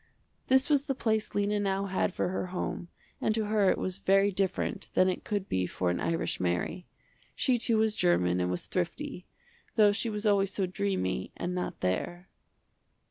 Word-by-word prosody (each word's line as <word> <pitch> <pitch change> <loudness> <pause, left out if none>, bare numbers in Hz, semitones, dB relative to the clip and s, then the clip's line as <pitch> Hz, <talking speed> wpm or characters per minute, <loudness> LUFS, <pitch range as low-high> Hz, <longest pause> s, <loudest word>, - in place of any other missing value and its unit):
This 265 0 +4
was 285 -2 +2
the 270 -3 -1
place 220 -3 -1
Lena 205 0 +1
now 195 -1 0
had 195 0 0
for 180 - -1
her 185 0 -2
home 180 -1 -4 0.3
and 215 - +1
to 220 -1 0
her 210 -2 +3
it - - +2
was 185 0 -3
very 195 +1 +4
different 190 0 -1
than 185 - +5
it 185 - -1
could 205 -2 -2
be 90 -1 0
for 90 -1 -1
an 90 - -2
irish 165 0 -1
Mary. 90 - -1 0.5
She 255 -3 +2
too 230 -1 +2
was 220 -1 +2
german 90 +1 +2
and 90 - 0
was 90 -1 -3
thrifty, 185 - -3 0.5
though 210 -2 +6
she 225 +3 -1
was 210 0 -4
always 200 -2 +3
so 195 -1 0
dreamy 185 - -2
and 175 +1 -3
not 180 0 -4
there. 175 - -2
195 Hz, 190 wpm, -29 LUFS, 175-215 Hz, 0.5 s, though